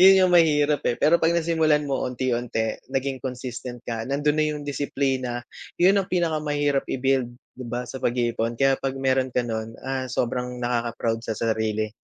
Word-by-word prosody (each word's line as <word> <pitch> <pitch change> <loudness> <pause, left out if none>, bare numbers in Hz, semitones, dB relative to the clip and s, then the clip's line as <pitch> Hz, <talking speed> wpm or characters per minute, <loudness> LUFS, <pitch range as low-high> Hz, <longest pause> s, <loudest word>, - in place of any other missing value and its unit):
Yun 190 +1 +8
yung 180 - +1
mahirap 150 -3 +4
eh, 120 - 0
pero 170 +3 +4
'pag 165 +1 +3
nasimulan 160 -3 +2
mo 135 - -1
unti-unti, 120 -3 -2
naging 135 0 -1
consistent 125 -1 -6
ka, 115 -1 -3
nandun 145 +2 +1
na - - +3
yung 150 -1 -4
disiplina, 135 -3 -1 0.4
yun 190 +3 +5
ang 190 - -5
pinakamahirap 150 -5 +1
i-build, 130 -2 +1 0.3
'di 130 - -7
ba, 125 +1 -3
sa 130 - -6
pag-iipon. 120 -1 0
Kaya 135 -1 +3
'pag 135 -1 -2
meron 130 -1 +1
ka 125 - +2
nun, 110 0 -4
ah, 130 -1 -2
sobrang 125 0 -2
nakaka-proud 115 -1 -1
sa 110 - -2
sarili. 110 -1 -1
130 Hz, 170 wpm, -24 LUFS, 120-145 Hz, 0.4 s, Yun